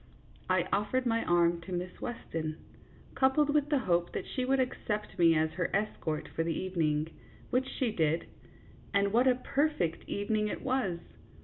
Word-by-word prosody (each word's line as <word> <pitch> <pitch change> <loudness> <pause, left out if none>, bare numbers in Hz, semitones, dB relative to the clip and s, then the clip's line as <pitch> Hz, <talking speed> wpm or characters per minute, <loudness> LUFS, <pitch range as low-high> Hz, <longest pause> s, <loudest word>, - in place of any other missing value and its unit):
I - - +2
offered 230 +6 +1
my 230 -1 +1
arm 170 0 +3
to 175 +3 -10
Miss 180 0 -4
Weston, 160 -10 -4 0.6
coupled 275 +3 +3
with 295 -1 +2
the 295 - +3
hope 175 -8 +1
that - - -3
she 255 - -2
would 270 +1 +2
accept 215 -6 -2
me 165 -1 +6
as 155 0 +2
her 180 0 -1
es 210 +2 0
cort 155 -1 -3
for - - -2
the 165 -1 -1
evening, 160 -4 0 0.4
which 260 +1 +2
she 250 -4 -1
did, 160 -4 +1 0.7
and 200 0 +3
what 245 +3 +4
a 255 - +5
per 280 +4 +1
fect 170 - -3
evening 210 +1 0
it - - -4
was 255 -10 0
200 Hz, 180 wpm, -31 LUFS, 170-255 Hz, 0.7 s, me